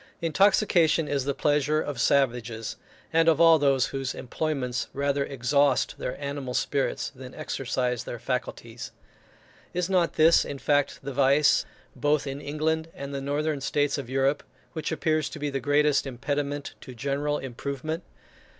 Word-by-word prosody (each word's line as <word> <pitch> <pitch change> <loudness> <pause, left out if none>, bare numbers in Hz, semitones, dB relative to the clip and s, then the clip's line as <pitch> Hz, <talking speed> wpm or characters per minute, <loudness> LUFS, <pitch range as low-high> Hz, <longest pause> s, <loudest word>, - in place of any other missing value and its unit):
Intoxication 170 -2 +3
is 140 -2 -1
the 140 -1 -1
pleasure 150 0 +2
of 145 -5 -3
savages, 120 -4 +1 0.4
and 165 0 +5
of 160 -1 +3
all 165 -1 +7
those 135 -2 +3
whose 135 -2 -3
employments 130 -2 -2
rather 140 0 0
exhaust 140 +1 +1
their 125 - -4
animal 140 -3 -4
spirits 140 -2 -1
than 130 -1 -11
exercise 125 -4 -2
their 120 - -6
faculties. 120 -1 -4 0.9
Is 180 +1 -1
not 180 -3 +2
this, 160 +2 +5
in 140 - -6
fact, 145 0 +1
the 140 0 -5
vice, 140 +2 +4 0.3
both 150 0 +1
in 140 +1 -5
England 160 +2 -1
and 140 0 -6
the 140 - -3
northern 145 +1 -1
states 145 +1 0
of 130 -3 -7
Europe, 135 +2 +1 0.3
which 160 -1 -3
appears 155 -1 0
to - - -8
be 145 -1 -3
the 135 - -1
greatest 145 +1 +2
impediment 145 +3 -3
to 130 - -10
general 140 +4 -1
improvement? 140 +5 -4
140 Hz, 150 wpm, -26 LUFS, 135-150 Hz, 0.9 s, all